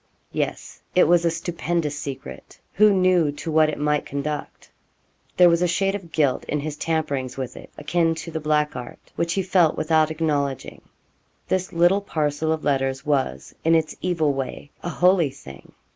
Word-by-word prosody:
Yes, -, -, -4 dB
it -, -, +6 dB
was 170 Hz, 0 st, +4 dB
a -, -, +4 dB
stupendous 165 Hz, -2 st, -2 dB
secret. 140 Hz, -2 st, -8 dB
Who 210 Hz, +1 st, +5 dB
knew 185 Hz, -5 st, +3 dB
to 160 Hz, +3 st, -5 dB
what 155 Hz, 0 st, +4 dB
it 155 Hz, -, -4 dB
might 150 Hz, 0 st, +1 dB
conduct? 145 Hz, +1 st, -5 dB, 0.7 s
There 180 Hz, -, +8 dB
was 170 Hz, 0 st, +3 dB
a 180 Hz, -, +3 dB
shade 195 Hz, +3 st, +1 dB
of 190 Hz, -5 st, -7 dB
guilt 145 Hz, -5 st, +1 dB
in 150 Hz, -, -2 dB
his 150 Hz, 0 st, -4 dB
tamperings 150 Hz, -5 st, -2 dB
with 130 Hz, -2 st, -5 dB
it, -, -, -11 dB
akin 165 Hz, -2 st, +1 dB
to 165 Hz, +1 st, -7 dB
the 160 Hz, -, -3 dB
black 150 Hz, -1 st, 0 dB
art, 125 Hz, -1 st, -7 dB, 0.2 s
which 170 Hz, 0 st, -1 dB
he 195 Hz, -, 0 dB
felt 180 Hz, -4 st, +3 dB
without 155 Hz, 0 st, +2 dB
acknowledging. 150 Hz, -4 st, -2 dB, 0.7 s
This 185 Hz, 0 st, 0 dB
little 175 Hz, +4 st, +3 dB
parcel 155 Hz, -4 st, -1 dB
of 160 Hz, -1 st, -2 dB
letters 135 Hz, -1 st, 0 dB
was, 135 Hz, -, -1 dB
in 165 Hz, +1 st, +4 dB
its 160 Hz, -1 st, 0 dB
evil 160 Hz, -5 st, +1 dB
way, 135 Hz, +2 st, -5 dB
a 175 Hz, -, -4 dB
holy 180 Hz, -3 st, +3 dB
thing. 70 Hz, -, -13 dB
155 Hz, 175 wpm, -23 LUFS, 145-170 Hz, 0.7 s, There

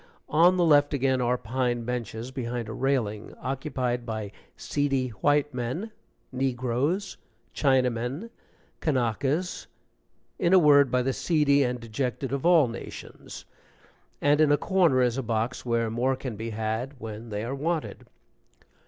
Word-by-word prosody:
On 175 Hz, +4 st, +5 dB
the 175 Hz, -, +3 dB
left 145 Hz, -2 st, +4 dB
again 130 Hz, -1 st, +1 dB
are 125 Hz, +1 st, +1 dB
pine 120 Hz, 0 st, -1 dB
benches 120 Hz, 0 st, -4 dB
behind 120 Hz, -3 st, -4 dB
a 110 Hz, -, -6 dB
railing, 120 Hz, -6 st, -1 dB
occupied 130 Hz, -2 st, -2 dB
by 110 Hz, -3 st, -5 dB, 0.3 s
seedy 135 Hz, -3 st, -1 dB
white 145 Hz, +5 st, +1 dB
men, 130 Hz, -, -3 dB, 0.4 s
negroes, 130 Hz, -, -1 dB, 0.4 s
Chinamen, 130 Hz, -, 0 dB, 0.5 s
Kanakas 140 Hz, -, -1 dB, 0.7 s
in 175 Hz, +1 st, +2 dB
a -, -, +8 dB
word, 145 Hz, -5 st, +6 dB
by 125 Hz, 0 st, +1 dB
the 135 Hz, +1 st, 0 dB
seedy 145 Hz, -3 st, +2 dB
and 125 Hz, -2 st, 0 dB
dejected 125 Hz, +3 st, -3 dB
of 140 Hz, +4 st, 0 dB
all 165 Hz, -6 st, +6 dB
nations 115 Hz, 0 st, -9 dB, 0.8 s
and 145 Hz, +1 st, +4 dB
in 150 Hz, -2 st, +4 dB
a 145 Hz, -, +5 dB
corner 170 Hz, -10 st, +3 dB
is 125 Hz, +1 st, 0 dB
a -, -, 0 dB
box 115 Hz, +1 st, -2 dB
where 115 Hz, -1 st, 0 dB
more 125 Hz, +3 st, +1 dB
can 130 Hz, -3 st, -6 dB
be 110 Hz, +2 st, -5 dB
had 110 Hz, +5 st, -3 dB
when 110 Hz, 0 st, -7 dB
they 105 Hz, 0 st, -3 dB
are 120 Hz, +3 st, -3 dB
wanted. 155 Hz, +3 st, -3 dB
130 Hz, 145 wpm, -27 LUFS, 120-145 Hz, 0.8 s, a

